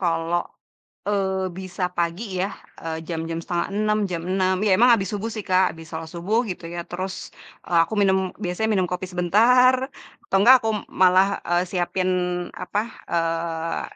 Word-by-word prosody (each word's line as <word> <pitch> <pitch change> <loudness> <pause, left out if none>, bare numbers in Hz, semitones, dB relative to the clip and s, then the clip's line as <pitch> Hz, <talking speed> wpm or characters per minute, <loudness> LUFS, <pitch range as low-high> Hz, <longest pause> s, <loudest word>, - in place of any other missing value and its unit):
kalau, 170 -1 0 0.7
eee, 190 -2 0
bisa 185 0 -5
pagi 170 +4 -1 0.2
ya, 190 - +1 0.3
e - - -12 0.2
jam-jam 165 -1 -3
05:30, 205 +5 -1
jam 170 -2 -2
06:00 185 0 +2
ya, - - +3
emang 245 +3 +6
abis 195 -4 +1
subuh 210 +2 -3
sih 215 - -3
Kak, 185 +1 +5
habis 165 -1 -12
sholat 160 0 -5
subuh 185 +7 0
gitu 180 - -6
ya, - - -3
terus 185 +2 -4 0.5
e - - -12
aku 195 - -1
minum 190 -1 +4 0.3
biasanya 180 +5 -1
minum, 190 -3 +2
kopi 180 +1 -2
sebentar 225 +9 +5 0.5
atau 195 - +1
enggak 240 +7 +8
aku 225 - 0 0.3
malah, 185 +1 +6 0.2
eee, 175 +1 +3
siapin 185 0 -1 0.5
apa, 180 +3 -3 0.3
eee, 165 0 -1
185 Hz, 160 wpm, -23 LUFS, 170-200 Hz, 0.7 s, enggak